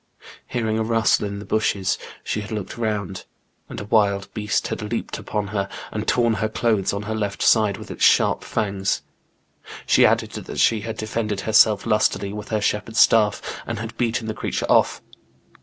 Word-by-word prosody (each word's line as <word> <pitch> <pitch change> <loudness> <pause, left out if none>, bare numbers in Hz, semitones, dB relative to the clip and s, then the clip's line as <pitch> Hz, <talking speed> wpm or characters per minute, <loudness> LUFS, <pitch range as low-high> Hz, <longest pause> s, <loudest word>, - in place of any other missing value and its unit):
Hearing 110 -2 -1
a - - +1
rustle 115 -2 +2
in 100 0 -5
the 100 - -8
bushes 100 -2 0 0.2
she 105 - -2
had 105 - -9
looked 105 -3 -4
round, 105 -5 -3 0.4
and - - -6
a - - -5
wild 100 -2 +1
beast 105 -2 -1
had - - -4
leaped 105 +2 -4
upon 105 -2 -3
her, 100 -1 -2 0.2
and 110 0 -4
torn 120 -2 +3
her 110 0 -1
clothes 110 -3 +1
on 100 +1 -4
her 110 +1 -3
left 105 -2 -2
side 110 -3 +4
with - - -9
its - - -4
sharp - - +4
fangs. 100 -2 -1 0.8
She - - +4
added - - +3
that - - -7
she 110 -2 +3
had 110 0 -5
defended 110 -2 -2
herself 110 -1 +4
lustily 105 -2 +1
with 105 0 -7
her 110 -2 0
shepherd's 105 +2 -1
staff, 105 -2 +4 0.2
and 115 - -3
had 115 +1 -6
beaten 115 -1 -1
the 110 - -2
creature - - -3
off. - - +3
105 Hz, 185 wpm, -22 LUFS, 100-110 Hz, 0.8 s, side